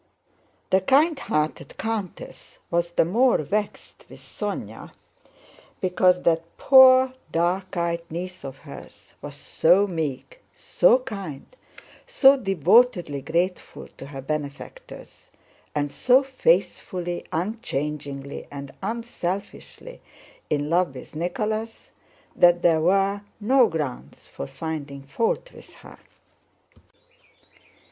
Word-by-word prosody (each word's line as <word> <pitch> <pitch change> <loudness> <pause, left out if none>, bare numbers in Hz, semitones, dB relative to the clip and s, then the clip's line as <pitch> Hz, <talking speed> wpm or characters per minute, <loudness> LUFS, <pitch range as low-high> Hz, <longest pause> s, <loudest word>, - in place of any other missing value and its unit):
The 190 - +4
kindhearted 270 - 0
countess 215 -4 -6
was 170 0 +1
the 170 - +2
more 235 +9 +3
vexed 205 +8 -4
with - - -13
Sónya - - -6 0.9
because 180 0 +2
that 165 -1 +2
poor, 260 -1 +7 0.2
dark 180 +3 -1
eyed 170 0 -1
niece 180 +3 -6
of 135 0 -8
hers - - -13
was - - -8
so 180 +5 +3
meek, 160 - -5
so - - +3
kind, 200 - -8 0.5
so 280 - +6
devotedly 195 - +2
grateful 175 +5 -3
to 135 - -9
her 135 -2 -8
benefactors, 150 - -7 0.5
and 145 -1 -1
so 255 +2 +3
faithfully, 200 - -1
unchangingly, 150 - -4
and 140 -1 -8
unselfishly 225 - -6 0.5
in 145 -1 -1
love 170 -3 +1
with 130 - -11
Nicholas, 215 +7 -4 0.4
that 175 0 +4
there 160 -2 +4
were 195 +3 +2 0.2
no 250 +3 +4
grounds 150 -6 -5
for 70 - -8
finding 145 - -6
fault 225 - -2
with - - -14
her. - - -15
180 Hz, 105 wpm, -24 LUFS, 155-225 Hz, 0.9 s, poor